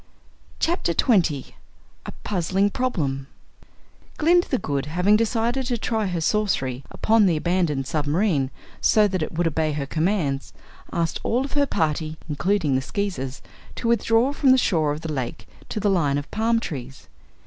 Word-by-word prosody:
Chapter 325 - 0
Twenty 170 - +2 0.5
A - - -4
Puzzling 195 +1 +1
Problem 145 - -2 0.9
Glinda 350 +3 +3
the 260 - +1
Good, 140 - -2
having 180 +6 +3
decided 230 +3 0
to 245 -2 0
try 220 -2 -1
her 180 -2 -2
sorcery 150 - 0
upon 220 -2 +3
the 170 -3 +2
abandoned 165 -5 0
submarine, 150 0 0 0.3
so 210 -1 +5
that 185 -3 -2
it 155 - -2
would 170 +2 0
obey 160 -1 0
her 145 -1 -2
commands, 155 -3 -1 0.4
asked 165 -1 -1
all 250 +4 0
of 275 - -8
her 285 -1 +2
party, 155 - -1
including 160 0 0
the 130 - +2
Skeezers, 160 -7 -4 0.3
to 235 - -3
withdraw 235 +3 +3
from 285 -2 +2
the 260 - +7
shore 160 - +2
of 150 +1 -4
the 160 -1 -4
lake 130 -4 -4 0.2
to 215 - -3
the 205 - 0
line 160 -8 +2
of 145 - -6
palm 225 +2 +1
trees. 135 - -7
175 Hz, 160 wpm, -23 LUFS, 150-220 Hz, 0.9 s, the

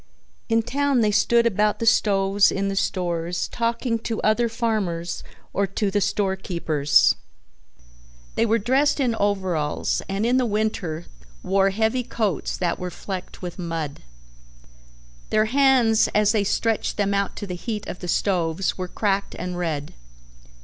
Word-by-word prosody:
In 225 0 +3
town 280 0 +1
they 210 -1 +3
stood 235 +3 +3
about 210 -1 +2
the 230 - -3
stoves 200 -3 +3
in 195 0 -1
the 195 - -2
stores 175 -3 -1
talking 230 0 -1
to 225 0 -3
other 230 +2 +2
farmers 200 -8 -2 0.3
or 200 0 +1
to 195 +1 -1
the 205 +1 +1
store 195 0 0
keepers. 155 -7 +2 1.2
They 230 - +1
were 225 +1 +3
dressed 265 +7 +2
in 250 -4 +2
overalls 190 -8 0
and 195 +3 -1
in 245 +2 +3
the 255 - +2
winter 205 -6 -2 0.4
wore 195 +1 +3
heavy 220 +5 0
coats 215 -7 -2
that 175 -2 -1
were 180 - -3
flecked 185 +1 -7
with 175 +1 -6
mud. 165 -4 -4 1.3
Their 215 0 +3
hands 250 -3 +4
as 210 0 +4
they 210 -2 +1
stretched 225 +2 0
them 200 -1 +1
out 200 -1 -1
to - - -5
the 185 - -5
heat 210 +3 -4
of - - -6
the 180 - -6
stoves 180 0 0
were 185 - -2
cracked 200 +1 -1
and 180 0 -4
red. 160 -5 -3
200 Hz, 155 wpm, -23 LUFS, 180-225 Hz, 1.3 s, hands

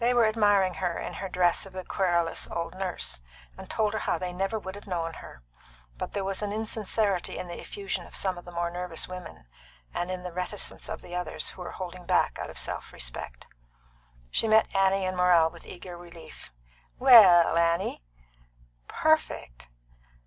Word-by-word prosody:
They 245 +1 +3
were 235 -2 +6
admiring 205 -4 +3
her, 175 -2 0
in - - -5
her 195 - -5
dress 180 +1 +2
of 190 - -14
the 185 -1 -6
querulous 175 -3 0
old 170 0 -3
nurse, 185 - -2 0.3
and - - -11
told 215 -1 +1
her 220 - -1
how - - 0
they 180 -1 -4
never 195 +4 -1
would 190 -3 -6
have 205 +1 -11
known 165 -3 -2
her. 65 - -11 0.5
But - - -5
there 200 - -1
was 195 +1 -2
an 205 -1 -2
insincerity 215 -2 0
in 180 - -5
the 175 - -7
effusion 195 -3 -4
of - - -7
some 190 -2 0
of 175 - -9
the 175 - -10
more 170 0 -1
nervous 175 -1 -3
women, 180 - -9 0.5
and 175 - -2
in 185 -1 -4
the 180 - -5
reticence 180 +4 -4
of - - -5
the 175 - -10
others, 180 -2 -2
who 185 - -10
were 175 - -6
holding 180 -1 -7
back - - +2
out - - -4
of - - -8
self - - -4
respect. - - -6 0.9
She - - +2
met 220 0 +4
Annie 195 0 +3
and 185 0 -1
Morrell 175 -3 +5
with 170 0 -14
eager 180 0 -8
relief. 170 -2 -12 0.5
"Well, 200 -11 +8
Annie?" 170 - +1 0.9
"Perfect!" 185 - 0
180 Hz, 185 wpm, -28 LUFS, 175-195 Hz, 0.9 s, Well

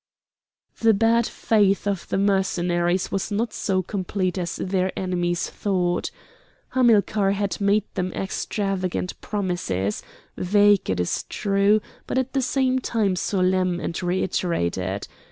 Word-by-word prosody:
The 225 -2 +4
bad 230 +2 +3
faith 205 -3 +2
of 200 -3 -2
the - - 0
Mercenaries 180 -2 +1
was 195 +2 -2
not 215 +2 -1
so 185 -2 0
complete 185 -1 -2
as 175 -2 -3
their 185 0 -1
enemies 175 -2 -1
thought. 180 -3 -1 0.6
Hamilcar 215 -5 +3
had 200 0 -2
made 200 +1 +3
them 185 0 -2
extravagant 195 -2 -2
promises, 175 - -2 0.3
vague, 205 +1 +3
it 95 -1 0
is 90 - 0
true, 200 +1 +2 0.3
but - - -2
at 260 0 -1
the 270 - +1
same 260 0 +1
time 215 -6 0
solemn 185 -1 +1
and 170 - -4
reiterated. 100 - -1
195 Hz, 125 wpm, -24 LUFS, 180-205 Hz, 0.6 s, The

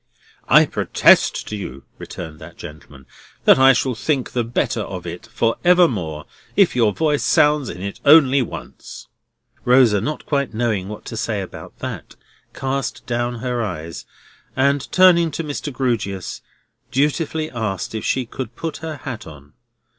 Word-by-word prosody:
"I - - +7
protest - - +3
to 105 - -4
you," 70 -10 -7 0.2
returned 80 -3 -8
that 80 +2 -12
gentleman, 75 -4 -12 0.4
"that - - +7
I 135 0 +8
shall 130 0 0
think 130 +3 -1
the 120 - 0
better 115 0 -1
of 90 -3 -6
it 85 +5 -7
for 115 0 0
evermore, 115 - +2 0.3
if 195 -9 +4
your 115 -4 +3
voice 150 +4 0
sounds 150 -2 +3
in 90 +2 -7
it 100 0 -5
only 140 -2 +6
once." 120 - -8 0.6
Rosa, 125 -5 +4
not 150 +7 -4
quite 140 -6 -1
knowing 110 -5 -1
what 105 - -8
to - - -7
say 110 -1 -2
about 95 - -9
that, - - -6 0.4
cast 135 -2 -3
down 120 -1 -2
her 125 -1 -1
eyes, 85 -6 -6 0.5
and 140 +1 +1
turning 175 -3 +5
to 160 +2 -4
Mr. 145 0 -4
Grewgious, 115 -8 -2 0.5
dutifully 155 +3 0
asked 110 -6 -3
if 110 - -4
she 130 -3 -1
should 125 -3 -5
put 165 -1 -5
her 160 -1 -6
hat 120 -7 -7
on? 75 -1 -14
120 Hz, 155 wpm, -20 LUFS, 100-140 Hz, 0.6 s, I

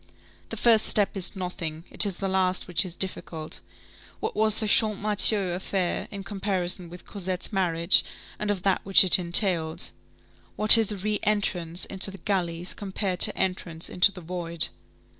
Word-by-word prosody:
The - - -7
first 225 -2 +2
step 205 -1 +1
is 190 +1 -2
nothing, 170 -4 -7
it 210 - +1
is 190 -3 -6
the 195 - -4
last 185 -1 -2
which 180 +2 +3
is 180 -3 -7
difficult. 165 -4 -5 0.6
What - - -5
was 215 0 +2
the 220 - -3
Champmathieu 210 -2 +1
affair 185 0 -4
in 200 -1 -9
comparison 190 -3 -2
with 180 +1 -14
Cosette's 190 0 -5
marriage 170 -2 +3 0.4
and 210 - -4
of 195 -3 -3
that 195 -2 0
which 195 0 +5
it 185 0 +6
entailed? 170 -2 +1 0.6
What 215 +1 +11
is 225 -2 +2
a 205 - -6
re 210 +2 -3
entrance 180 -5 -2
into 195 +1 -3
the 195 - -11
galleys, 180 -3 -3
compared 195 -2 -5
to - - +3
entrance 170 -3 -3
into 180 +2 +3
the 185 - -12
void? 170 -1 +2
190 Hz, 165 wpm, -24 LUFS, 175-205 Hz, 0.6 s, What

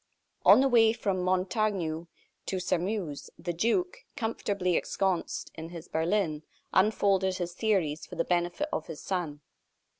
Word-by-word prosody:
On - - +8
the 275 - +4
way 225 -3 +5
from 200 -5 -1
Montaignac 185 -3 0 0.4
to 190 - -1
Sairmeuse, 180 -4 -2
the 175 +1 -3
duke, 235 - +1 0.2
comfortably 200 -7 -1
ensconced 190 -1 -1
in 160 0 -7
his 170 -1 -9
berlin, 160 -2 0 0.3
unfolded 190 -2 +3
his 175 -1 -3
theories 180 -7 0
for - - -9
the 165 - 0
benefit 175 - 0
of - - -2
his 160 -3 -7
son. 165 -6 -3
185 Hz, 140 wpm, -29 LUFS, 170-210 Hz, 0.4 s, On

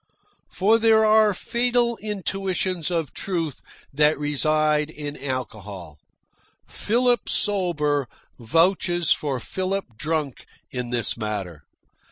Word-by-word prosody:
For 215 +4 +3
there 220 -1 +5
are 215 0 +5
fatal 235 +3 +1
intuitions 190 -4 -2
of 165 -4 -2
truth 165 -7 -3 0.3
that 150 +2 +3
reside 150 +1 +1
in 145 -2 -6
alcohol. 105 - -6 0.7
Philip 240 +1 +1
sober 150 -9 0 0.3
vouches 175 - +2
for 140 -4 +1
Philip 185 - -3
drunk 150 -1 -3 0.2
in 125 -1 -4
this 120 -3 0
matter. 100 -8 -4
160 Hz, 100 wpm, -24 LUFS, 135-195 Hz, 0.7 s, there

